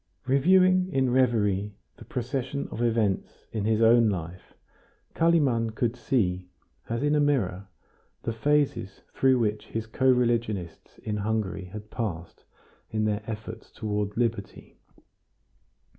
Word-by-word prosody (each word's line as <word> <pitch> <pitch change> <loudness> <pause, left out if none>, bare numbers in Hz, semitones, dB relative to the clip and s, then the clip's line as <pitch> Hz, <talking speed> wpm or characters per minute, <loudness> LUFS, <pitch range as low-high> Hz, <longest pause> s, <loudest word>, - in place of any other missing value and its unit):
Reviewing 185 +7 +4
in 130 -2 +1
reverie 105 -6 +1 0.2
the - - -12
procession 130 +2 -3
of 115 - -5
events 110 -5 0
in 105 -3 -2
his 110 +1 +2
own 115 0 +6
life, 90 -1 -6 0.6
Kalimann 135 -10 +2
could 120 0 0
see, 90 -9 -1 0.4
as 115 +3 -2
in 145 0 +2
a 150 - +3
mirror, 110 -10 0 0.6
the 115 - -2
phases 115 -5 0
through 130 -1 +3
which 105 -2 -1
his 115 0 -4
co 130 +4 +1
religionists 115 -8 -1
in 105 -1 -2
Hungary 105 -2 -2
had 105 +3 -10
passed 90 -9 -5 0.4
in 110 -1 -1
their 105 0 0
efforts 110 0 -7
toward 105 -1 -3
liberty. 120 -1 -3
115 Hz, 130 wpm, -27 LUFS, 105-130 Hz, 0.6 s, own